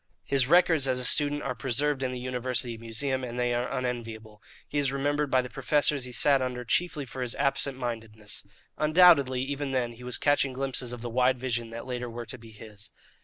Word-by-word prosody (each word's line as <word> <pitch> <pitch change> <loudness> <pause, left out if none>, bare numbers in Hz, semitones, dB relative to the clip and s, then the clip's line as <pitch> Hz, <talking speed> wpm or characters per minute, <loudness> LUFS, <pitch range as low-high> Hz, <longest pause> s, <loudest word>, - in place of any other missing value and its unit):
His 135 -3 +1
records 165 -3 +4
as 130 -1 +1
a 125 - -2
student 145 +1 +3
are - - -2
preserved 135 +3 0
in 130 -1 -1
the 125 - -5
university 125 -1 -1
museum, 120 +4 -2
and 125 0 -5
they 120 0 +1
are 120 +1 -1
unenviable. 115 -4 -5 0.3
He 145 - -1
is 140 -2 +1
remembered 145 +1 0
by 130 -1 +3
the - - -6
professors 140 0 +1
he 125 - -8
sat 140 +2 +4
under 125 -1 -3
chiefly 155 +2 0
for 130 +1 -7
his 125 -2 -1
absent 140 -1 0
mindedness. 110 -4 -6 0.4
Undoubtedly, 150 -5 +5
even 140 +1 -3
then, 125 -3 -1
he 120 +2 -13
was 125 0 -2
catching 145 -2 +2
glimpses 130 -2 -2
of 120 -1 -7
the 120 - -4
wide 125 +1 +2
visions 120 -2 -2
that 115 - -6
later 125 -1 -4
were 120 +1 -6
to 125 +3 -8
be 115 0 -13
his. 105 -1 -10
130 Hz, 210 wpm, -28 LUFS, 120-140 Hz, 0.4 s, Undoubtedly